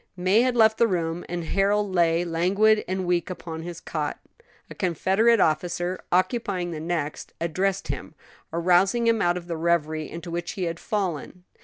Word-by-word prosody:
May 185 +5 +3
had 250 0 +1
left 220 -2 +4
the 235 - +5
room, 170 -3 -2
and 175 0 -3
Harold 200 +3 +1
lay 170 -1 +3
languid 195 +6 +3
and 185 0 -2
weak 175 0 0
upon 165 -3 -6
his 170 0 -7
cot. 150 -2 -3 0.5
A - - -9
Confederate 195 +6 +2
officer, 175 +3 0
occupying 185 -2 0
the 160 - -5
next, 160 -2 -3
addressed 185 +4 -1
him, - - -5 0.4
rousing 180 +7 +3
him 230 -1 +3
out 175 0 +2
of 175 - -7
the 170 -2 -4
reverie 160 -2 0
into 170 +1 -7
which 175 0 -3
he 190 - -4
had 165 -1 -3
fallen. 180 -3 -3
175 Hz, 170 wpm, -25 LUFS, 170-195 Hz, 0.5 s, the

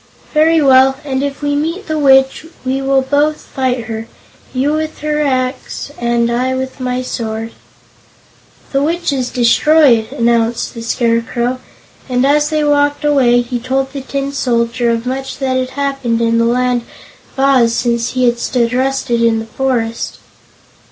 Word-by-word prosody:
"Very 315 0 +4
well; 265 0 +5
and 265 -2 -1
if 280 +1 -4
we 290 0 0
meet 330 +7 -2
the 310 -1 -2
Witch, 270 +2 +3 0.2
we 265 +1 -1
will 270 0 +2
both 290 +3 +1
fight 255 -3 -2
her 225 0 -6 0.4
you 270 +3 0
with 310 -1 -4
your 300 0 0
axe 260 0 -2
and 235 0 +1
I 255 +2 0
with 260 +1 -5
my 255 0 -2
sword." 225 -2 -4 1.2
"The 275 - +1
Witch 335 +1 0
is 255 -2 -2
destroyed," 245 -1 +3
announced 235 0 0
the 230 - -7
Scarecrow, 235 +1 -1 0.5
and 250 +1 +1
as 295 +1 +3
they 310 -1 0
walked 290 0 +1
away 255 -5 +4
he 245 0 -4
told 265 +2 -2
the 275 - -5
Tin 275 +1 -3
Soldier 240 -2 0
of 230 0 -1
much 265 +1 -4
that 265 -2 -1
had 255 0 -1
happened 275 -4 -2
in 230 0 +2
the 230 - +3
Land 245 +1 +1 0.6
of - - -6
Oz 260 -4 +3
since 235 -1 -1
he 255 -1 +1
had 240 -1 +1
stood 240 -1 0
rusted 260 -2 0
in 230 -1 +3
the 225 - -4
forest. 230 -2 -2
260 Hz, 165 wpm, -15 LUFS, 235-280 Hz, 1.2 s, well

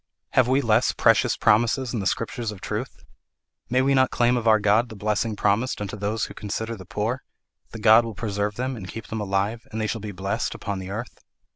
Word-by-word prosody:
Have 130 -2 +4
we 130 +2 +3
less 115 -1 +3
precious - - +3
promises 120 +4 +2
in 115 - -1
the 100 - -1
Scriptures 115 +2 -2
of 105 - -9
truth? - - -5 0.7
May 130 +1 +3
we 140 +1 +3
not 130 -1 +4
claim 120 0 +2
of 120 -2 -1
our 110 -1 +6
God 105 +4 +3
the 110 - -9
blessing 105 +2 -1
promised 105 +5 +1
unto 105 0 -4
those 105 +2 -1
who - - -9
consider 110 +3 -4
the 95 -3 -11
poor: 115 +6 -2 0.5
the 115 0 -4
Lord 110 +2 +8
will 115 -2 -6
preserve 105 -1 -2
them 130 +2 -2
and 100 -5 -8
keep 115 +2 -7
them 110 -1 -3
alive, 100 +3 -1
and 110 - -4
they 110 - 0
shall 110 +1 -3
be 105 0 -5
blessed 95 +1 -2
upon 100 -1 -4
the 95 0 -7
earth? 110 +5 -6
110 Hz, 225 wpm, -24 LUFS, 105-120 Hz, 0.7 s, Lord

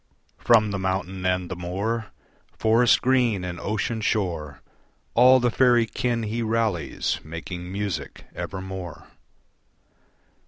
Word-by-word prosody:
From 110 -3 +4
the 100 - -2
mountain 95 0 -2
and 90 -1 0
the 95 - -5
moor, 100 +6 -3 0.5
Forest 115 +2 +4
green 125 -7 +2
and 90 -1 -5
ocean 110 +2 -2
shore 85 - -2 0.5
All 130 +2 +7
the 120 -1 +1
faerie 120 -1 +4
kin 120 0 -2
he 110 +2 -2
rallies 110 -8 -1
Making 85 +3 -7
music 95 -8 -4
evermore. 95 -3 -6
100 Hz, 115 wpm, -24 LUFS, 90-115 Hz, 0.5 s, All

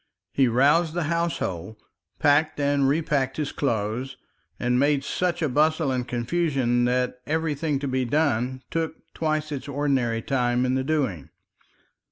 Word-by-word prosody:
He 135 -2 +4
roused 150 +7 +3
the 175 - 0
household, 110 - -2 0.4
packed 145 +1 +3
and 140 -1 +2
repacked 145 -3 0
his 150 -2 -2
clothes, 115 0 -2 0.4
and 125 0 +1
made 140 0 +2
such 175 +2 -1
a - - +3
bustle 155 +2 +2
and 125 -1 -2
confusion 120 -1 0
that 125 0 0
everything 155 -1 0
to 140 +1 -3
be 130 -1 0
done 130 -2 0
took 160 0 -1 0.2
twice 155 -1 -1
its 140 -1 -5
ordinary 135 -5 0
time 125 -2 +1
in 130 - +1
the 130 0 0
doing. 130 - -1
140 Hz, 145 wpm, -25 LUFS, 125-155 Hz, 0.4 s, He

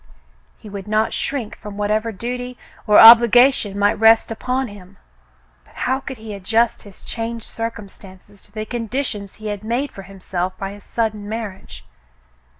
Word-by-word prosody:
He - - -14
would 200 -1 -8
not 215 +1 +1
shrink 255 -7 -3
from 210 -2 -10
whatever 215 +2 0
duty 245 +4 -5 0.3
or 210 - +6
obligation 235 -1 +7
might 205 0 +3
rest 225 +1 +5
upon 255 +3 -2
him, 200 -2 -14 0.7
but - - -24
how 260 +1 -1
could 265 -1 -8
he 220 -1 -8
adjust 225 +4 0
his 200 -2 -15
changed 230 -1 -5
circumstances 200 -3 -9
to - - -22
the 215 0 -5
conditions 230 -3 -4
he 215 0 -7
had 205 0 -5
made 240 +6 -2
for 195 - -10
himself 185 -1 -5
by 195 0 -5
his 205 0 -12
sudden 215 -3 -3
marriage. 190 - -7
215 Hz, 155 wpm, -20 LUFS, 200-230 Hz, 0.7 s, obligation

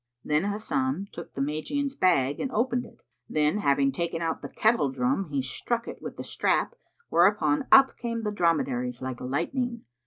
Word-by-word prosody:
Then 150 +4 +1
Hasan 215 +1 -1
took 170 - -10
the 135 - -2
Magian's 265 - -2
bag 145 - +2
and 260 - -2
opened 245 +2 0
it, - - -17 0.3
then 155 +6 +1
having 140 -5 +2
taken 170 +3 -2
out 165 -1 -2
the - - -6
kettle 220 - +2
drum 130 +7 0
he 140 -2 -1
struck 235 - -2
it - - -8
with - - -7
the - - -5
strap, - - 0 0.4
whereupon 295 -4 +3
up 270 0 +7
came 230 -1 -3
the 210 - -1
dromedaries 130 - 0
like 130 -2 -5
lightning. 230 - -2
170 Hz, 175 wpm, -27 LUFS, -, 0.4 s, up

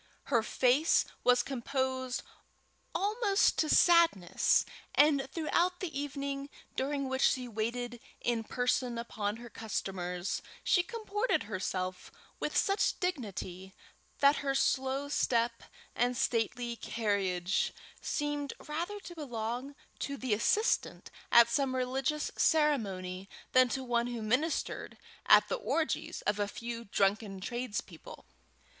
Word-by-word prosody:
Her 235 - +5
face 255 +7 +3 0.2
was 245 0 +5
composed, 260 -1 -2 0.7
almost 410 0 +2
to 310 - +2
sadness, 335 - +4 0.3
and 285 -2 +4
throughout 345 +3 +1
the 340 -6 -5
evening, 280 0 -3 0.3
during 275 +1 -1
which 265 0 -2
she 250 -1 +2
waited 235 +2 -3 0.2
in 235 -2 0
person 245 +1 0
upon 215 -3 -3
her 240 +1 -10
customers, 185 -4 -3 0.2
she 355 - +4
comported 425 -2 -1
herself 185 -2 -4 0.3
with - - -1
such 395 +1 +2
dignity, 195 - -4 0.5
that 280 +1 +6
her 275 -1 -1
slow 270 +1 +1
step 235 -4 +1 0.3
and 245 +1 +1
stately 240 -1 0
carriage 195 -6 0 0.3
seemed 290 -1 -2
rather 340 +7 -3
to 350 - -9
belong 250 -2 -4 0.2
to 280 0 -3
the 255 -5 -1
assistant 415 - +1 0.2
at 235 -1 +8
some 260 +2 0
religious 265 +4 -1
ceremony 195 - +1 0.2
than 255 -1 +5
to 265 +2 -2
one 240 -1 +1
who 240 -2 -4
ministered 255 +9 -1 0.3
at - - +7
the - - -1
orgies 330 -9 -2
of 205 0 0
a 205 - +1
few 235 +2 -6
drunken 195 0 0
tradespeople. 240 - -5
250 Hz, 120 wpm, -32 LUFS, 225-290 Hz, 0.7 s, at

